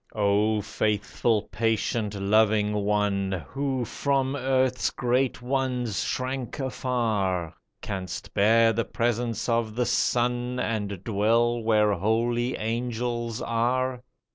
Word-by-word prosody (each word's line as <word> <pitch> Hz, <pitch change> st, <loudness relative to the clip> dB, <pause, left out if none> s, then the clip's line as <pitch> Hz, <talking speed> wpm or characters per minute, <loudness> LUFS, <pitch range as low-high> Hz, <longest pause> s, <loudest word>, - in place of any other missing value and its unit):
O 105 Hz, +1 st, +2 dB
faithful, 105 Hz, +1 st, 0 dB
patient, 110 Hz, 0 st, 0 dB
loving 105 Hz, +1 st, +2 dB
one, 100 Hz, -4 st, 0 dB
Who 135 Hz, -2 st, -2 dB
from 135 Hz, +3 st, 0 dB
earth's 130 Hz, -1 st, +1 dB
great 125 Hz, 0 st, 0 dB
ones 125 Hz, -5 st, -1 dB
shrank 130 Hz, -1 st, -3 dB
afar, 110 Hz, -, -1 dB, 0.3 s
Canst 95 Hz, -3 st, -5 dB
bear 115 Hz, +2 st, +4 dB
the 115 Hz, +2 st, 0 dB
presence 115 Hz, +1 st, -1 dB
of 115 Hz, -2 st, 0 dB
The 125 Hz, 0 st, +1 dB
Son, 125 Hz, +1 st, 0 dB
And 105 Hz, -5 st, -2 dB
dwell 115 Hz, +3 st, +2 dB
where 105 Hz, -2 st, +3 dB
holy 115 Hz, +5 st, 0 dB
angels 120 Hz, 0 st, -2 dB
are 125 Hz, +2 st, 0 dB
115 Hz, 105 wpm, -26 LUFS, 105-125 Hz, 0.3 s, bear